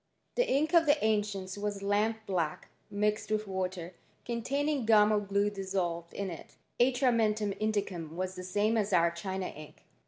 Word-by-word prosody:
The - - +1
ink 305 +5 +1
of 330 -2 +5
the 290 +1 +5
ancients 205 -3 -1
was 205 -1 -3
lamp 215 +2 0
black 170 -6 -2 0.2
mixed 210 +1 0
widi 215 0 0
water, 185 -2 -4 0.3
containing 275 +4 -1
gum 215 -1 +6
or 210 - +3
glue 200 0 0
dissolved 185 -4 -3
in 195 -2 -3
it. 165 - -10 0.2
Atrm^ 250 0 +3
mentum 215 -2 +1
indicum 195 -7 -2
was 185 +1 -3
the 185 - -7
same 205 +5 +1
as 205 -2 0
our 170 -1 +4
China 190 +2 -4
ink. 155 0 -12
205 Hz, 165 wpm, -31 LUFS, 185-220 Hz, 0.3 s, gum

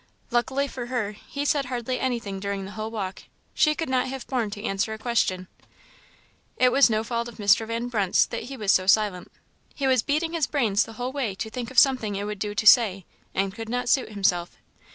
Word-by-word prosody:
Luckily 265 +4 +1
for 245 -3 -6
her, 240 -5 -2
he 280 +7 -6
said 285 -1 +1
hardly 250 0 -3
anything 230 -7 -2
during 200 0 -3
the 195 - -8
whole 215 +1 -5
walk; 200 -4 -5 0.3
she 305 -1 +3
could 325 - -3
not 260 -1 +1
have 265 0 -6
borne 245 -5 -1
to 205 0 -8
answer 210 0 -1
a - - -10
question. 215 -5 0 1.1
It 250 0 +4
was 275 -1 +5
no 215 -1 0
fault 235 0 -2
of 240 - -10
Mr. 205 +1 +3
Van 230 +1 -3
Brunt's 205 -6 +2
that 230 - -5
he 270 +2 -8
was 210 -4 +2
so 185 -1 +2
silent 200 -3 +2 0.4
he 280 - -2
was 260 -3 +3
beating 310 +6 -1
his 325 -4 +1
brains 225 -8 +1
the 225 - -11
whole 245 +3 -4
way 260 -8 -2
to 220 +3 -5
think 245 -1 -5
of 260 - -12
something 250 -7 +4
it 200 - -3
would 210 -1 -5
do 205 0 -3
to 215 - -1
say, 205 -5 +6 0.3
and 195 0 0
could 225 +1 -7
not 245 +1 -2
suit 260 -2 +2
himself. 190 -4 0
230 Hz, 220 wpm, -25 LUFS, 205-255 Hz, 1.1 s, say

